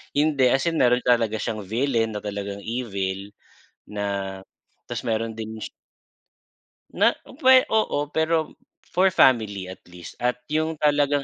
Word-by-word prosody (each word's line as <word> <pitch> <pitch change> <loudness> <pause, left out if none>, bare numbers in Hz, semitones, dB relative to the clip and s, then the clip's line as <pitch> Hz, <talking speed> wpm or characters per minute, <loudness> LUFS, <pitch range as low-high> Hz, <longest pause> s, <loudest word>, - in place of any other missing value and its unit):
Hindi 145 -3 +3
as 135 +2 +2
in 165 -1 0
meron 125 0 +3
talaga 115 -3 +2
siyang 110 0 -3
villain 115 -1 0
na 105 - -5
talagang 100 -1 -5
evil 100 -5 -3 0.6
na 100 -2 -3 0.5
ta's - - -4
meron 115 0 -2
ding 110 0 -6 1.5
Na - - +6 0.3
puwe 260 -2 +7
oo, 215 - +1 0.2
pero 160 0 +1 0.4
for 185 +2 +4
family 110 - +3
at - - -18
least 90 -1 -11
at 125 0 +1
yung 155 +1 0
talagang 145 -1 +2
120 Hz, 135 wpm, -24 LUFS, 105-145 Hz, 1.5 s, puwe